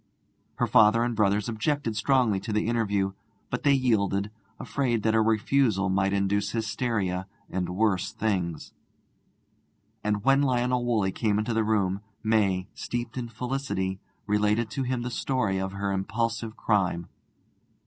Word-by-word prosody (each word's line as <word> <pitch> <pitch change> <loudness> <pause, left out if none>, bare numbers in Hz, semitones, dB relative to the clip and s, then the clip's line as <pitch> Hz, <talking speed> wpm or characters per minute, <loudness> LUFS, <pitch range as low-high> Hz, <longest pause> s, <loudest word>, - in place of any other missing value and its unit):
Her - - +1
father 110 +2 +5
and 120 -1 -1
brothers 105 -1 +2
objected 115 +1 -1
strongly 110 -3 +2
to 100 +3 -5
the 105 0 +1
interview, 105 -4 0 0.4
but 125 - -2
they 145 -1 +4
yielded, 105 -6 +1 0.3
afraid 120 -6 -1
that 110 - +2
a 110 - +4
refusal 110 -2 +2
might 95 +1 +1
induce 100 +1 +1
hysteria 105 -4 -1 0.2
and 90 -1 -2
worse 95 -1 +1
things. 90 -7 -2 1.3
And 105 -1 0
when 135 +2 +4
Lionel 125 -2 +1
Woolley 105 -5 +1
came 105 0 0
into 110 +2 -1
the 110 0 +2
room, 100 -3 +1 0.2
May, 100 -4 +2
steeped 120 -1 -4
in 120 -2 -4
felicity, 115 -6 -3 0.3
related 105 +2 +1
to 135 - -3
him 125 -2 -1
the 125 - -4
story 110 -6 0
of 95 0 -3
her 100 0 -2
impulsive 115 +3 -2
crime. 90 -5 0
110 Hz, 145 wpm, -27 LUFS, 100-120 Hz, 1.3 s, father